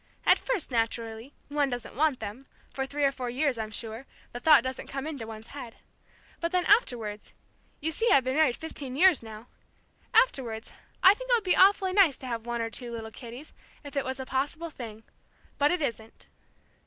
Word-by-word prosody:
At -, -, +6 dB
first, 445 Hz, -, -1 dB
naturally, 230 Hz, +1 st, -2 dB, 0.2 s
one 290 Hz, -1 st, +1 dB
doesn't 245 Hz, -2 st, -5 dB
want 295 Hz, -1 st, +1 dB
them, 245 Hz, +7 st, -7 dB, 0.3 s
for 265 Hz, 0 st, -2 dB
three 290 Hz, +1 st, -2 dB
or 275 Hz, -, +4 dB
four 255 Hz, -2 st, -5 dB
years, 260 Hz, -1 st, 0 dB
I'm 220 Hz, -1 st, -3 dB
sure, 225 Hz, +4 st, -7 dB, 0.3 s
the 245 Hz, -, -5 dB
thought 295 Hz, -2 st, +6 dB
doesn't 260 Hz, 0 st, -5 dB
come 275 Hz, 0 st, -5 dB
into 280 Hz, -8 st, -5 dB
one's 220 Hz, 0 st, -9 dB
head. 255 Hz, -5 st, -8 dB, 0.6 s
But 335 Hz, 0 st, -2 dB
then, 360 Hz, -1 st, +1 dB
afterwards, 235 Hz, -, +1 dB, 0.5 s
you 320 Hz, +2 st, -1 dB
see, 455 Hz, +9 st, +1 dB
I've 270 Hz, -, +6 dB
been 260 Hz, +1 st, -1 dB
married 300 Hz, -6 st, +3 dB
fifteen 280 Hz, -5 st, -6 dB
years 355 Hz, 0 st, +5 dB
now! 220 Hz, 0 st, -10 dB, 0.7 s
afterwards, 260 Hz, -, +1 dB, 0.3 s
I 380 Hz, +1 st, +9 dB
think -, -, -9 dB
it -, -, +4 dB
would 465 Hz, -3 st, +3 dB
be 365 Hz, -, +3 dB
awfully 380 Hz, -1 st, +5 dB
nice 375 Hz, -8 st, +5 dB
to -, -, -10 dB
have 235 Hz, -2 st, -4 dB
one 235 Hz, -1 st, -1 dB
or 225 Hz, -, -4 dB
two 240 Hz, -1 st, -4 dB
little 225 Hz, -1 st, -6 dB
kiddies, 245 Hz, +6 st, -10 dB, 0.3 s
if 285 Hz, 0 st, -10 dB
it 280 Hz, -, +1 dB
was 260 Hz, +1 st, -4 dB
a 265 Hz, -, -4 dB
possible 290 Hz, +6 st, -2 dB
thing. 225 Hz, -5 st, -9 dB, 0.6 s
But 290 Hz, +1 st, +4 dB
it 355 Hz, -2 st, 0 dB
isn't." 225 Hz, -4 st, -5 dB
265 Hz, 200 wpm, -28 LUFS, 230-310 Hz, 0.7 s, I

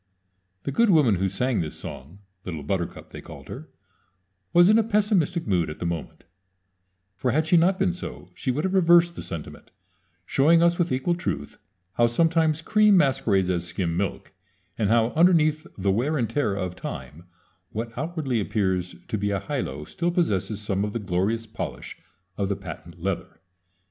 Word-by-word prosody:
The -, -, -3 dB
good 230 Hz, +11 st, +3 dB
woman 145 Hz, -, +4 dB
who 95 Hz, +2 st, +1 dB
sang 120 Hz, +4 st, 0 dB
this 80 Hz, -, -5 dB
song 80 Hz, +10 st, -9 dB, 0.2 s
little 80 Hz, -5 st, -5 dB
Buttercup, 85 Hz, +2 st, -3 dB
they -, -, -8 dB
called -, -, -12 dB
her -, -, -8 dB, 0.8 s
was 175 Hz, +1 st, +6 dB
in 215 Hz, +2 st, +6 dB
a -, -, +3 dB
pessimistic 205 Hz, -6 st, +1 dB
mood 90 Hz, -6 st, +1 dB
at 75 Hz, -, -7 dB
the 85 Hz, -, -5 dB
moment; 85 Hz, -2 st, -4 dB, 0.9 s
for 130 Hz, -, -1 dB
had 155 Hz, +6 st, +2 dB
she 160 Hz, -, +3 dB
not 180 Hz, +3 st, +4 dB
been 190 Hz, -2 st, +1 dB
so 180 Hz, -, -8 dB
she -, -, -4 dB
would 140 Hz, +5 st, 0 dB
have 190 Hz, -, -1 dB
reversed 175 Hz, -2 st, +5 dB
the -, -, -6 dB
sentiment, 85 Hz, -4 st, -7 dB, 0.6 s
showing 165 Hz, -, +4 dB
us 170 Hz, +1 st, +3 dB
with 175 Hz, -1 st, +1 dB
equal 130 Hz, +7 st, +1 dB
truth 75 Hz, -, -4 dB, 0.4 s
how 120 Hz, -, +5 dB
sometimes 160 Hz, +4 st, +2 dB
cream 210 Hz, 0 st, +5 dB
masquerades 105 Hz, -, +2 dB
as 90 Hz, -1 st, -1 dB
skim 85 Hz, -1 st, -2 dB
milk, 95 Hz, +1 st, -3 dB, 0.4 s
and 105 Hz, -3 st, 0 dB
how 115 Hz, 0 st, +3 dB
underneath 155 Hz, 0 st, +3 dB
the 100 Hz, 0 st, +1 dB
wear 130 Hz, +10 st, 0 dB
and 120 Hz, -5 st, -1 dB
tear 140 Hz, -9 st, 0 dB
of 90 Hz, -2 st, -3 dB
time 85 Hz, -2 st, -8 dB, 0.4 s
what 115 Hz, +2 st, -5 dB
outwardly 150 Hz, -4 st, -2 dB
appears 95 Hz, -4 st, -1 dB
to 110 Hz, -, -2 dB
be 100 Hz, 0 st, 0 dB
a 100 Hz, -1 st, 0 dB
"high -, -, -3 dB
low" 70 Hz, +3 st, -5 dB
still 170 Hz, -, -2 dB
possesses 110 Hz, -, 0 dB
some 100 Hz, -2 st, -1 dB
of 105 Hz, 0 st, -3 dB
the 115 Hz, -, -2 dB
glorious 100 Hz, +4 st, -1 dB
polish 110 Hz, -, -6 dB, 0.4 s
of 100 Hz, -1 st, 0 dB
the 100 Hz, -, 0 dB
"patent 85 Hz, -2 st, -10 dB
leather." 95 Hz, +1 st, -4 dB
115 Hz, 180 wpm, -25 LUFS, -, 0.9 s, was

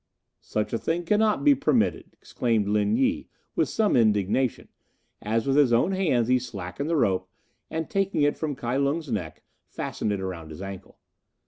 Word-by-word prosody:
"Such 105 Hz, 0 st, -3 dB
a 115 Hz, -, 0 dB
thing 170 Hz, +2 st, -1 dB
cannot 210 Hz, +3 st, +2 dB
be 290 Hz, -, +7 dB
permitted," 120 Hz, -, +1 dB
exclaimed 115 Hz, -4 st, -1 dB
Lin 105 Hz, -, +2 dB
Yi, 270 Hz, +3 st, 0 dB, 0.3 s
with -, -, +1 dB
some 215 Hz, -2 st, +1 dB
indignation, 110 Hz, +2 st, +2 dB, 0.5 s
as 110 Hz, +2 st, -1 dB
with 135 Hz, -1 st, +1 dB
his 140 Hz, -5 st, +5 dB
own 120 Hz, +11 st, +3 dB
hands 155 Hz, -12 st, +1 dB
he 125 Hz, 0 st, +3 dB
slackened 110 Hz, -, -5 dB
the 165 Hz, -, +1 dB
rope 95 Hz, -9 st, +1 dB, 0.4 s
and, 160 Hz, 0 st, -3 dB
taking 195 Hz, -6 st, 0 dB
it 145 Hz, -, +2 dB
from 150 Hz, -3 st, -3 dB
Kai 125 Hz, +1 st, -2 dB
Lung's 140 Hz, +1 st, -1 dB
neck, 90 Hz, -8 st, -4 dB, 0.2 s
fastened 105 Hz, -, -3 dB
it 100 Hz, -, -1 dB
around 90 Hz, -4 st, -5 dB
his 80 Hz, -, -9 dB
ankle. 95 Hz, -1 st, -9 dB
125 Hz, 175 wpm, -26 LUFS, 105-160 Hz, 0.5 s, be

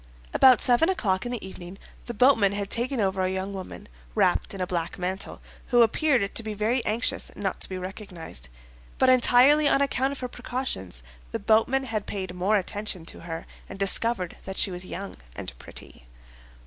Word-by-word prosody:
About 260 Hz, -2 st, +7 dB
seven 250 Hz, +8 st, +4 dB
o'clock 205 Hz, -, 0 dB
in -, -, -4 dB
the 235 Hz, -6 st, -3 dB
evening, 185 Hz, 0 st, -10 dB, 0.3 s
the 240 Hz, -, -3 dB
boatman 225 Hz, -5 st, +5 dB
had 200 Hz, -1 st, -4 dB
taken 250 Hz, +2 st, 0 dB
over 190 Hz, -2 st, +1 dB
a 185 Hz, -, +1 dB
young 190 Hz, +1 st, -3 dB
woman, 190 Hz, -1 st, -8 dB, 0.3 s
wrapped -, -, +2 dB
in -, -, -7 dB
a 185 Hz, -, 0 dB
black 170 Hz, -2 st, -2 dB
mantle, 185 Hz, +2 st, -4 dB, 0.3 s
who 240 Hz, -2 st, +6 dB
appeared 235 Hz, -3 st, +2 dB
to -, -, +2 dB
be 215 Hz, -1 st, -5 dB
very 225 Hz, +4 st, +1 dB
anxious 225 Hz, +2 st, 0 dB
not 195 Hz, -2 st, -3 dB
to -, -, +1 dB
be 185 Hz, -, -4 dB
recognized; 180 Hz, -, -7 dB, 0.5 s
but 260 Hz, -, +4 dB
entirely 255 Hz, +4 st, +6 dB
on 275 Hz, -, +4 dB
account 270 Hz, -1 st, +1 dB
of 280 Hz, -, -6 dB
her 250 Hz, -, -2 dB
precautions, 245 Hz, -, -4 dB, 0.3 s
the -, -, -1 dB
boatman 235 Hz, +5 st, +2 dB
had 220 Hz, -5 st, -3 dB
paid 190 Hz, -3 st, -4 dB
more 190 Hz, +4 st, +2 dB
attention 200 Hz, -2 st, -3 dB
to -, -, -4 dB
her 165 Hz, -1 st, -6 dB, 0.2 s
and 190 Hz, -, -8 dB
discovered 195 Hz, -1 st, 0 dB
that 190 Hz, 0 st, -6 dB
she 195 Hz, -, +4 dB
was 180 Hz, +1 st, -5 dB
young 195 Hz, +1 st, -6 dB, 0.2 s
and -, -, -5 dB
pretty. -, -, -10 dB
205 Hz, 185 wpm, -26 LUFS, 185-245 Hz, 0.5 s, About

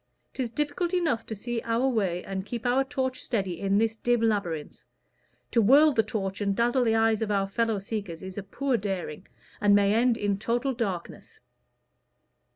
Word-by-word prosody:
'Tis 255 Hz, -3 st, -2 dB
difficult 300 Hz, +8 st, -1 dB
enough 305 Hz, -11 st, 0 dB
to 220 Hz, -, -4 dB
see 235 Hz, +3 st, -3 dB
our 230 Hz, +3 st, 0 dB
way 195 Hz, -8 st, 0 dB
and 190 Hz, -1 st, -4 dB
keep 235 Hz, 0 st, -5 dB
our 250 Hz, +2 st, +3 dB
torch 265 Hz, -2 st, -2 dB
steady 190 Hz, -7 st, -2 dB
in 195 Hz, 0 st, +1 dB
this 225 Hz, +1 st, +1 dB
dim 240 Hz, +1 st, +1 dB
labyrinth: 200 Hz, -9 st, -2 dB, 0.7 s
to 230 Hz, -, +4 dB
whirl 285 Hz, +8 st, +6 dB
the 230 Hz, -, +3 dB
torch 195 Hz, -2 st, -4 dB
and 200 Hz, -1 st, 0 dB
dazzle 240 Hz, +3 st, +2 dB
the 225 Hz, -2 st, +2 dB
eyes 225 Hz, -1 st, +2 dB
of 220 Hz, -, -1 dB
our 195 Hz, -1 st, +1 dB
fellow 225 Hz, +2 st, 0 dB
seekers 195 Hz, -4 st, -5 dB
is 190 Hz, 0 st, -7 dB
a 205 Hz, -, -4 dB
poor 250 Hz, +7 st, -1 dB
daring, 190 Hz, -4 st, -4 dB, 0.3 s
and 205 Hz, 0 st, +5 dB
may 200 Hz, 0 st, +4 dB
end 235 Hz, +1 st, +3 dB
in 200 Hz, -2 st, -1 dB
total 240 Hz, +5 st, 0 dB
darkness. 200 Hz, -8 st, -5 dB
225 Hz, 180 wpm, -27 LUFS, 195-245 Hz, 0.7 s, whirl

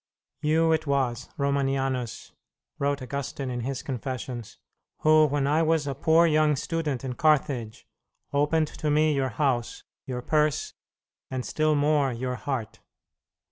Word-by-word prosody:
"You 160 Hz, +2 st, +3 dB
it 160 Hz, -1 st, +1 dB
was, 130 Hz, -4 st, 0 dB
Romanianus," 135 Hz, -3 st, -1 dB, 0.5 s
wrote 140 Hz, -1 st, 0 dB
Augustine 140 Hz, 0 st, -4 dB
in 125 Hz, -, -3 dB
his 130 Hz, +2 st, -4 dB
Confessions, 125 Hz, -3 st, -5 dB, 0.4 s
"who, 155 Hz, 0 st, +6 dB
when 145 Hz, -1 st, 0 dB
I 150 Hz, +3 st, +2 dB
was 160 Hz, -2 st, +2 dB
a 140 Hz, -, -2 dB
poor 160 Hz, +5 st, +4 dB
young 155 Hz, -2 st, +3 dB
student 145 Hz, -3 st, -2 dB
in 130 Hz, -, -3 dB
Carthage, 135 Hz, -6 st, +1 dB, 0.5 s
opened 150 Hz, +2 st, +2 dB
to 155 Hz, -, -3 dB
me 155 Hz, +1 st, +3 dB
your 135 Hz, -2 st, 0 dB
house, 120 Hz, -2 st, -1 dB, 0.2 s
your 125 Hz, -2 st, -4 dB
purse, 150 Hz, 0 st, +1 dB, 0.6 s
and 130 Hz, -1 st, -3 dB
still 155 Hz, 0 st, +1 dB
more 145 Hz, -2 st, +2 dB
your 125 Hz, +2 st, -3 dB
heart. 125 Hz, -2 st, -4 dB
140 Hz, 140 wpm, -26 LUFS, 130-155 Hz, 0.6 s, who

